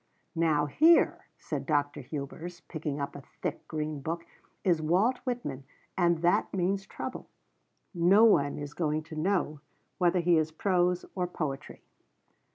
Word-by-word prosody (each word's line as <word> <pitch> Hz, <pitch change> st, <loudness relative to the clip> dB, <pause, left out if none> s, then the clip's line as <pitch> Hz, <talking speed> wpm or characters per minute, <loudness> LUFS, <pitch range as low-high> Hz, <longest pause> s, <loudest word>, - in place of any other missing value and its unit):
"Now 160 Hz, -3 st, +2 dB
here," 320 Hz, -, +4 dB
said -, -, -5 dB
Dr. 145 Hz, -2 st, 0 dB
Hubers, 160 Hz, +5 st, -7 dB
picking 155 Hz, -3 st, -4 dB
up 140 Hz, -, -4 dB
a 145 Hz, -, -7 dB, 0.2 s
thick, -, -, -3 dB
green 150 Hz, -2 st, -3 dB
book, 165 Hz, +3 st, -4 dB, 0.4 s
"is 170 Hz, -4 st, +2 dB
Walt 190 Hz, +11 st, +2 dB
Whitman 235 Hz, -, -3 dB, 0.3 s
and 170 Hz, -2 st, +2 dB
that 175 Hz, -, +3 dB
means 195 Hz, +1 st, -1 dB
trouble. -, -, -6 dB, 0.6 s
No 185 Hz, +5 st, +5 dB
one 145 Hz, -11 st, +4 dB
is 145 Hz, 0 st, -6 dB
going 155 Hz, -2 st, -1 dB
to 160 Hz, 0 st, -10 dB
know 155 Hz, -2 st, 0 dB, 0.4 s
whether 180 Hz, 0 st, +3 dB
he 170 Hz, -1 st, +4 dB
is 155 Hz, 0 st, -1 dB
prose 180 Hz, +1 st, +1 dB
or 180 Hz, -2 st, -1 dB
poetry." 150 Hz, -5 st, -5 dB
165 Hz, 145 wpm, -29 LUFS, 150-180 Hz, 0.6 s, No